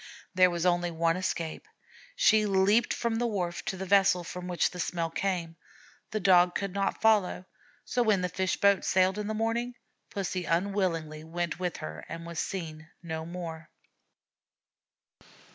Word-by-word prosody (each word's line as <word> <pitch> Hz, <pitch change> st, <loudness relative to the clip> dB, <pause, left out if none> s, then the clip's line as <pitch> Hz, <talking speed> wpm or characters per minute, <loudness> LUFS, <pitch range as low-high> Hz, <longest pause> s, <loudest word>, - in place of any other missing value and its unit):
There 185 Hz, 0 st, +5 dB
was 170 Hz, 0 st, -2 dB
only 175 Hz, -1 st, +2 dB
one 165 Hz, 0 st, +1 dB
escape. 175 Hz, -, -3 dB, 0.5 s
She 220 Hz, -, +4 dB
leaped 200 Hz, +4 st, +3 dB
from 235 Hz, -1 st, -1 dB
the 240 Hz, +1 st, +1 dB
wharf 180 Hz, -6 st, -2 dB
to 190 Hz, -, -3 dB
the 190 Hz, -, -4 dB
vessel 195 Hz, -2 st, +4 dB
from 180 Hz, +1 st, -7 dB
which 180 Hz, -1 st, +1 dB
the 180 Hz, -, -9 dB
smell 170 Hz, -1 st, -2 dB
came. 170 Hz, -3 st, -2 dB, 0.5 s
The 215 Hz, -, -2 dB
Dog 180 Hz, -2 st, +5 dB
could 195 Hz, -2 st, -2 dB
not 200 Hz, 0 st, -1 dB
follow, 210 Hz, -4 st, +3 dB, 0.4 s
so 250 Hz, -, 0 dB
when 215 Hz, -5 st, +3 dB
the 180 Hz, -, 0 dB
fish 185 Hz, +1 st, -1 dB
boat 200 Hz, -1 st, +4 dB
sailed 185 Hz, +2 st, +2 dB
in 210 Hz, -, -3 dB
the 215 Hz, -, -2 dB
morning 230 Hz, +2 st, -1 dB, 0.3 s
Pussy 185 Hz, -2 st, -3 dB
unwillingly 165 Hz, -4 st, -1 dB
went 170 Hz, +1 st, -3 dB
with 180 Hz, -2 st, -2 dB
her 80 Hz, 0 st, -7 dB
and 165 Hz, 0 st, -6 dB
was 170 Hz, -1 st, -5 dB
seen 160 Hz, -4 st, -5 dB
no 160 Hz, -1 st, -5 dB
more. 165 Hz, -2 st, -7 dB
180 Hz, 160 wpm, -29 LUFS, 170-200 Hz, 0.5 s, There